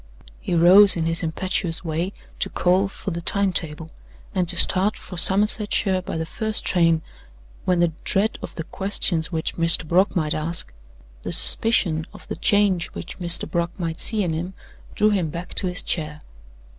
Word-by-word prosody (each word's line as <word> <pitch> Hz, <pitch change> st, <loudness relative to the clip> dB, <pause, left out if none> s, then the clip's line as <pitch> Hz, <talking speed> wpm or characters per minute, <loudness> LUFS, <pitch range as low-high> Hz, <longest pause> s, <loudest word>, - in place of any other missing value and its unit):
He 175 Hz, -, -3 dB
rose 185 Hz, +4 st, +7 dB
in 165 Hz, -, -2 dB
his 165 Hz, 0 st, +3 dB
impetuous 170 Hz, +1 st, -2 dB
way 165 Hz, +4 st, -3 dB, 0.3 s
to -, -, -2 dB
call 185 Hz, +2 st, +1 dB
for 195 Hz, 0 st, -7 dB
the 170 Hz, 0 st, -5 dB
time 200 Hz, +2 st, -1 dB
table, 160 Hz, -1 st, -4 dB, 0.4 s
and 180 Hz, -4 st, -1 dB
to 180 Hz, -, -3 dB
start 190 Hz, +4 st, +2 dB
for 180 Hz, -, -11 dB
Somersetshire 195 Hz, +1 st, +2 dB
by 180 Hz, -, -6 dB
the 160 Hz, -, -3 dB
first 220 Hz, +5 st, 0 dB
train, 165 Hz, -3 st, +1 dB, 0.6 s
when 180 Hz, -1 st, +1 dB
the 175 Hz, -, +2 dB
dread 205 Hz, +3 st, -1 dB
of -, -, -9 dB
the 165 Hz, -, -5 dB
questions 180 Hz, -2 st, -1 dB
which 160 Hz, -2 st, -4 dB
Mr. 165 Hz, -1 st, +5 dB
Brock 185 Hz, +6 st, +1 dB
might 155 Hz, -4 st, -1 dB
ask, 160 Hz, -, -5 dB, 0.5 s
the -, -, -6 dB
suspicion 170 Hz, -8 st, +3 dB
of -, -, -14 dB
the -, -, -4 dB
change 200 Hz, -4 st, +1 dB
which 180 Hz, -, -9 dB
Mr. 170 Hz, -1 st, +5 dB
Brock 170 Hz, 0 st, -2 dB
might 165 Hz, -3 st, -5 dB
see 215 Hz, -3 st, -1 dB
in 170 Hz, -3 st, -2 dB
him, 175 Hz, +4 st, -5 dB, 0.4 s
drew 215 Hz, 0 st, +2 dB
him 185 Hz, -6 st, -1 dB
back 170 Hz, +3 st, -8 dB
to 190 Hz, -, 0 dB
his 180 Hz, 0 st, +1 dB
chair. 150 Hz, -3 st, -4 dB
175 Hz, 180 wpm, -21 LUFS, 165-195 Hz, 0.6 s, rose